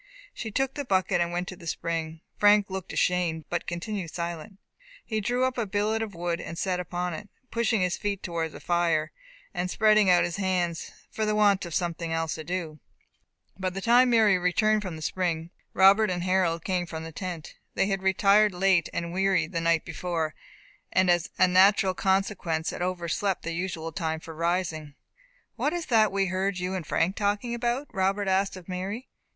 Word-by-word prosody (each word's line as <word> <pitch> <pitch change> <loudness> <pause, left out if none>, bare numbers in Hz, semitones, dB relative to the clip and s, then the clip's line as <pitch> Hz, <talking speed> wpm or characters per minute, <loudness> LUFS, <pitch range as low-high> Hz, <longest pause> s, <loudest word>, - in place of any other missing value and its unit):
She 225 - -5
took 270 +5 -1
the 285 - -4
bucket, 185 -5 +1
and 170 0 0
went 175 +1 -2
to 185 - -7
the 170 -1 -12
spring. 165 -1 -3
Frank 205 -1 +4
looked 190 -1 -5
ashamed, 170 -3 0
but 175 - -2
continued 175 +1 -4
silent. 170 +3 -5 0.5
He 220 -2 -2
drew 245 +4 0
up 260 -1 0
a 225 - -1
billet 210 +3 0
of 215 -4 -5
wood 170 0 -2
and 165 - -7
sat 185 0 -1
upon 180 0 -3
it, 205 +6 -8 0.2
pushing 230 -2 +1
his 180 0 0
feet 200 -2 -3
towards 165 -3 -3
the - - -9
fire, 170 -3 +1 0.4
and 180 +1 -2
spreading 215 -1 +4
out 175 -1 +5
his 175 +1 -2
hands, 180 -4 -1 0.2
for 220 - -3
the 215 0 +1
want 200 -3 +3
of 170 - -5
something 170 -2 -2
else 165 -1 -1
to 155 - -6
do. 165 -3 -4 0.8
By 190 -1 0
the 185 +2 -5
time 240 +4 +5
Mary 215 -5 +4
returned 215 +4 +2
from 185 -5 -5
the 155 - -8
spring, 170 -1 -2 0.2
Robert 200 +3 +5
and 175 -1 -2
Harold 180 -3 +1
came 180 -2 -1
from 160 -1 -6
the 160 - -7
tent. 170 -2 -6 0.2
They - - +2
had 195 -1 -1
retired 195 +1 +4
late 185 -2 +3
and 170 0 -4
weary 190 -3 +2
the 165 0 -3
night 165 -1 +2
before, 165 -2 -3 0.6
and 185 -1 +4
as 175 -1 +1
a 185 - +5
natural 190 +1 +5
consequence 190 -4 0
had - - -6
overslept 180 +2 -1
their 165 - -3
usual 165 -2 -3
time 160 0 -2
for 160 0 -10
rising. 165 -3 -2 0.6
"What 300 - 0
is 345 -2 -3
that 220 -4 +3
we 195 0 +1
heard 190 +1 -1
you 180 +1 -2
and 180 -5 -4
Frank 180 +4 +1
talking 205 +4 0
about?" 240 +3 -1
Robert 195 0 0
asked 190 0 +1
of 180 - -12
Mary. 195 +7 -4
185 Hz, 195 wpm, -27 LUFS, 170-200 Hz, 0.8 s, out